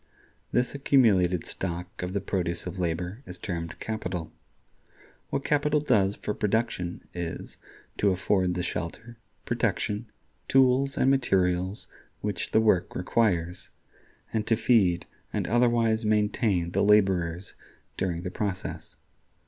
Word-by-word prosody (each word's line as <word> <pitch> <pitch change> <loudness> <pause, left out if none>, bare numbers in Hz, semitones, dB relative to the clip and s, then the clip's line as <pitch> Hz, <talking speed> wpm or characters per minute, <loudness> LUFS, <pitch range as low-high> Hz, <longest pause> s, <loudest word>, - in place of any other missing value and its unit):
This 125 0 +1
accumulated 105 - +3
stock 90 0 -4
of 90 +1 -3
the 100 - -1
produce 85 -3 -2
of 90 +1 -6
labor 90 +5 -2
is 90 0 -7
termed 85 -3 -5
Capital. 90 -7 -4 1.0
What 140 - -2
capital 150 +1 +2
does 105 -9 +2
for 105 - -3
production 105 -5 -1
is, 85 -2 -5 0.4
to 100 - +4
afford 95 -1 +1
the 90 - -1
shelter, 115 +8 -5 0.3
protection, 105 +3 -1 0.4
tools, 135 +1 +3
and 135 - +4
materials 95 -6 +1 0.4
which 100 -4 -3
the - - +4
work 100 -6 +2
requires, 90 -3 0 0.6
and 110 -1 -1
to 115 - +4
feed 105 -7 +3 0.3
and - - -2
otherwise 115 -1 +3
maintain 105 -4 +1
the - - +1
laborers 95 -4 +2 0.4
during 85 -2 -2
the 90 - -4
process. 95 -2 -4
100 Hz, 125 wpm, -27 LUFS, 90-115 Hz, 1.0 s, to